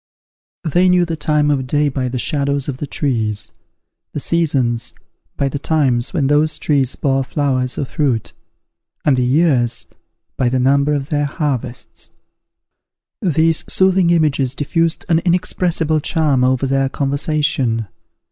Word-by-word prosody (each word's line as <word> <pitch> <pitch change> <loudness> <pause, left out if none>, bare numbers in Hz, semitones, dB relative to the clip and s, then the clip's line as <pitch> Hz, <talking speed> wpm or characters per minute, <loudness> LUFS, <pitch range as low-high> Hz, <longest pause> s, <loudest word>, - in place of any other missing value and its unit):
They 175 +3 +2
knew 180 -1 +4
the 165 -1 -3
time 150 -1 +1
of 130 -3 -1
day 150 +3 +1
by 130 -2 -2
the 125 - -4
shadows 140 0 -1
of 135 -3 -4
the 145 - -5
trees; 110 -8 -2 0.6
the - - -3
seasons, 135 -8 0 0.4
by 140 - +1
the 140 +1 -3
times 135 -6 0
when 160 -7 0
those 150 +2 +2
trees 135 -4 0
bore 135 -1 0
flowers 130 -2 -1
or - - -1
fruit; 130 -5 -1 0.7
and 145 - +4
the 125 - 0
years, 125 -3 +1 0.5
by 125 - +1
the 130 +1 0
number 140 +3 +2
of 140 -1 -4
their 145 -1 0
harvests. 140 -5 -4 1.1
These 165 -4 +2
soothing 190 -2 +3
images 145 -6 +1
diffused 165 +3 -1
an 165 -3 +3
inexpressible 175 -2 0
charm 145 -4 +1
over 130 +1 +2
their 135 0 +1
conversation. 140 -5 -1
145 Hz, 140 wpm, -18 LUFS, 130-160 Hz, 1.1 s, knew